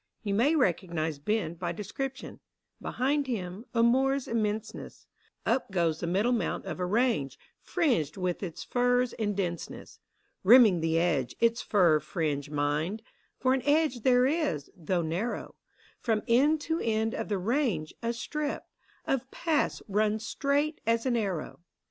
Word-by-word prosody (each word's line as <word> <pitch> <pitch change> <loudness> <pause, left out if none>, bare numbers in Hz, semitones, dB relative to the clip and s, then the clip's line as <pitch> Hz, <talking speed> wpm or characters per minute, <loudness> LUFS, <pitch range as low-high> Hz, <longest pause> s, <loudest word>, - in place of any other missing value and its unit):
You 205 -2 -1
may 260 +10 +3
recognise 170 - 0
Ben 210 +1 -1
by 170 0 -4
description; 260 - -6 0.4
Behind 280 +2 0
him 200 -2 -4
— - - -43
a 230 - +4
moor's 265 +3 +3
immenseness: 220 -1 -3 0.4
Up 265 - +1
goes 170 -4 0
the 170 - -3
middle 200 +8 +1
mount 240 - -1
of - - -5
a 180 - -1
range, 210 - +1 0.2
Fringed 240 - 0
with 180 -2 -2
its 175 -5 -5
firs 245 0 +1
in 210 -2 -2
denseness. 175 -3 -5 0.4
Rimming 215 -3 +7
the 165 0 +1
edge, 155 -7 +1
its 230 0 +2
fir 175 -7 +4
fringe, 150 -4 -2
mind! 150 +8 -1 0.3
For 255 0 +2
an 265 - 0
edge 290 -2 +2
there 250 +1 +4
is, 275 - -1
though 175 0 -1
narrow; 175 +9 -3 0.5
From 220 -3 0
end 290 +6 +4
to 325 +2 -1
end 220 0 0
of - - -4
the 205 - 0
range, 205 - 0
a 230 0 0
strip 295 +5 -3 0.4
Of 265 0 -1
path 315 0 -1
runs 215 +2 0
straight 290 +4 0
as 230 +1 +2
an 250 -2 +1
arrow. 195 -8 -2
220 Hz, 155 wpm, -29 LUFS, 175-255 Hz, 0.5 s, Rimming